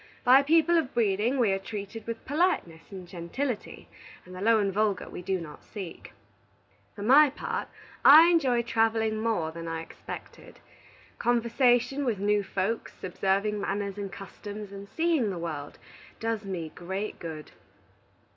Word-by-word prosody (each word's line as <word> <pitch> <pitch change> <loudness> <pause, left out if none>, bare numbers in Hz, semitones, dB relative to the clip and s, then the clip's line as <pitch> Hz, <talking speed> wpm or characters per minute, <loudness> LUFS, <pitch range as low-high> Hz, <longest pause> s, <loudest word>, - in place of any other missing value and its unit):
By 260 +2 +7
people 330 +3 +4
of 280 -5 -4
breeding 225 +3 +1
we 230 -6 +3
are 195 - 0
treated 205 +2 -7
with 230 -1 -5
politeness 285 - -1
and 185 -2 -8
gentility, 205 +9 -5 0.4
and 180 - -12
the 185 - -7
low 225 +2 +4
and 200 -2 0
vulgar 210 -2 0
we - - -8
do 190 +1 -1
not 155 -3 -10
seek. 190 -6 -9 0.8
For 205 - -7
my 280 +6 +7
part, 280 - -4 0.4
I 310 +4 +10
enjoy 265 -9 +3
travelling 225 -2 +1
more 215 -8 0
than 165 0 -7
I 165 0 -3
expected. - - -10 0.6
Conversation 245 +3 +2
with 235 -6 0
new 205 +1 +2
folks, 200 +3 -3
observing 195 +3 0
manners 200 0 -3
and 200 -1 -5
customs, 205 +1 -8
and 200 0 -9
seeing 320 -9 +1
the 185 - -4
world, 155 -4 -5 0.4
does 225 -2 -2
me 170 -5 -4
great 190 +4 -5
good. 160 -2 -7
210 Hz, 150 wpm, -28 LUFS, 190-240 Hz, 0.8 s, I